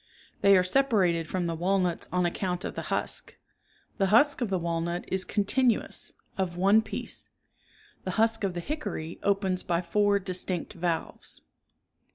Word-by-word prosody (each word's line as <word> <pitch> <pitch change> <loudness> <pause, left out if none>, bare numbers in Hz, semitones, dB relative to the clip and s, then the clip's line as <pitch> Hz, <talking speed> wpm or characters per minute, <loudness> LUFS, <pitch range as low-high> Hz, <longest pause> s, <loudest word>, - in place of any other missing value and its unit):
They 200 -1 +7
are 180 - +4
separated 185 - +2
from 185 -2 -1
the 170 - -1
walnuts 180 +1 0
on 180 0 +2
account 180 +1 -2
of - - -4
the - - -4
husk; - - -2 0.6
the 195 - +3
husk 270 +7 +4
of 235 - 0
the 190 - +1
walnut 170 0 -2
is 190 0 0
con 200 +2 0
tinuous, 250 +2 +1 0.3
of 175 -2 -1
one 200 +4 +5
piece; 220 - -6 0.7
the - - -4
husk 225 0 +3
of 190 -3 -1
the 175 - -2
hickory 260 - -4
opens 195 -2 +1
by 170 0 -1
four 205 +3 +3
distinct 185 -2 -3
valves. 170 -1 -3
185 Hz, 160 wpm, -28 LUFS, 175-205 Hz, 0.7 s, They